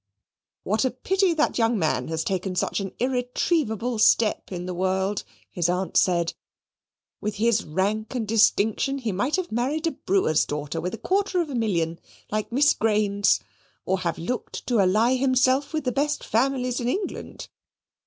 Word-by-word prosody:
"What 215 +5 +1
a 260 - +2
pity 370 +8 +1
that 305 -4 +1
young 230 0 +2
man 160 -5 0
has 160 0 -2
taken 190 0 -2
such 180 - 0
an 195 -1 -4
irretrievable 250 - 0
step 220 -1 +3
in 180 -1 -4
the 180 - -4
world!" 190 +2 -1 0.3
his 175 -1 0
aunt 180 +1 -2
said; 170 -2 +2 0.9
"with 210 0 -3
his 225 +1 +2
rank 205 +9 -2
and 230 -4 -2
distinction 225 +4 +2
he 235 -5 -2
might 245 +10 0
have 370 -2 -3
married 270 +8 -1
a 330 - +1
brewer's 190 - +1
daughter 145 -1 -4
with 180 +5 -3
a - - -11
quarter 390 - 0
of 325 -4 -1
a - - -4
million 170 -8 0 0.3
like 215 +2 -2
Miss 290 +5 +4
Grains; 205 -2 +2 0.4
or 190 0 0
have 170 -3 -2
looked 210 +10 -4
to 240 -3 +1
ally 215 +7 +3
himself 260 +1 +2
with 315 -1 -2
the 250 - 0
best 290 +4 -1
families 250 +1 0
in 240 - -2
England. 380 +10 -4
220 Hz, 170 wpm, -25 LUFS, 190-260 Hz, 0.9 s, Miss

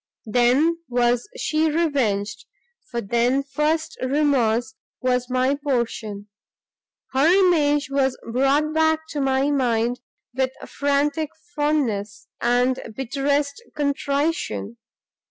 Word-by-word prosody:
Then 250 +9 +3
was 240 0 +1
she 315 +1 +1
revenged, 265 -11 0 0.4
for 235 -1 -3
then 240 +6 +1
first 305 +3 -1
remorse 255 -5 +1 0.3
was 250 -1 0
my 255 +2 +2
portion: 225 -6 -2 0.8
her 270 +4 +3
image 320 -6 +3
was 270 -2 +1
brought 275 +6 +2
back 315 0 +2
to 290 - -3
my 270 +1 +2
mind 245 -3 +1 0.3
with 260 0 0
frantic 285 +2 0 0.3
fondness, 235 -9 -1 0.2
and 245 +2 +2 0.2
bitterest 280 - -1
contrition. 285 -4 -1
270 Hz, 100 wpm, -23 LUFS, 240-295 Hz, 0.8 s, Then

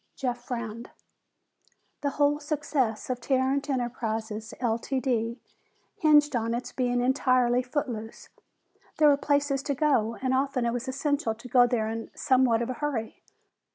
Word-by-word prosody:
Jeff 245 -2 -3
frowned. 235 -2 -5 1.1
The 285 - 0
whole 290 0 +3
success 290 -6 -1
of 250 -1 -4
Tarrant 265 +3 0
Enterprises, 225 -4 -3
Ltd., 235 0 -1 0.6
hinged 295 -6 +4
on 230 0 0
its 245 - -5
being 245 -1 0
entirely 255 -1 +3
footloose. 245 -4 -5 0.7
There 305 -1 +6
were 285 - +6
places 285 -1 +1
to 280 0 -2
go, 250 -6 +2
and 260 0 0
often 265 -2 0
it 235 - 0
was 245 +2 -4
essential 275 -3 -1
to 230 +3 -11
go 245 0 +5
there 230 -3 0
in 225 +1 -5
somewhat 255 -3 +3
of 245 - -3
a 255 - -8
hurry. 255 -7 -3
255 Hz, 145 wpm, -27 LUFS, 235-280 Hz, 1.1 s, There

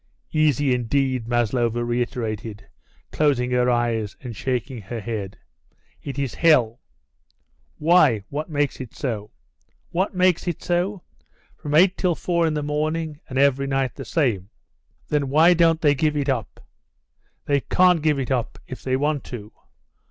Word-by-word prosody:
"Easy, 145 -3 +2
indeed," 125 0 0
Maslova 120 0 0
reiterated, 115 -4 -3 0.4
closing 135 -5 +1
her 125 0 +2
eyes 115 -4 0
and 120 -4 -8
shaking 125 0 -3
her 115 +4 -6
head. 105 -3 -5 0.6
"It 140 -1 -6
is 135 -3 -2
hell." 125 -9 +3 1.0
"Why, 155 - +4
what 150 +4 -4
makes 145 -3 -1
it 125 - -9
so?" 110 -6 -4 0.6
"What 185 +3 -1
makes 180 -1 +2
it 175 - -3
so! 180 +2 -1 0.5
From 150 -1 -4
eight 185 +4 +5
till 180 -3 +1
four 170 -1 0
in 155 - -1
the 150 - -2
morning, 155 +1 -2
and 130 - -4
every 140 0 +3
night 135 -1 0
the - - -8
same!" 110 - 0 0.6
"Then 145 -2 0
why 160 +5 +6
don't 165 -1 +3
they 145 -4 +4
give 150 +1 0
it 145 -1 -1
up?" 120 -6 -3 0.8
"They 140 -1 +2
can't 180 +3 +3
give 150 -2 +2
it 135 -1 -3
up 125 -3 -1
if 130 - -9
they 130 -1 0
want 145 +1 0
to. 105 -4 -8
135 Hz, 150 wpm, -23 LUFS, 120-155 Hz, 1.0 s, why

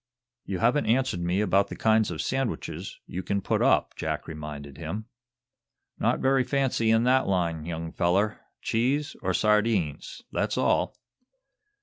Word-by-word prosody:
"You 95 - -3
haven't 120 +9 +2
answered 125 -5 +2
me 90 +3 0
about 100 -1 +3
the - - -7
kinds 110 -1 +3
of 85 -3 -3
sandwiches 135 -3 -3
you 90 - -5
can 100 +2 -1
put - - 0
up," - - +3
Jack - - -3
reminded 75 -3 -7
him. 95 +7 -4 0.9
"Not - - +1
very 135 0 +3
fancy 125 -3 +1
in 115 +1 +4
that 130 +2 +3
line, 85 -4 0
young 80 -1 -4
feller. 100 +5 +1 0.2
Cheese, 140 +7 0
or 95 -2 0
sardines; 105 -8 +1
that's - - -1
all." - - +1
105 Hz, 145 wpm, -27 LUFS, 85-120 Hz, 0.9 s, in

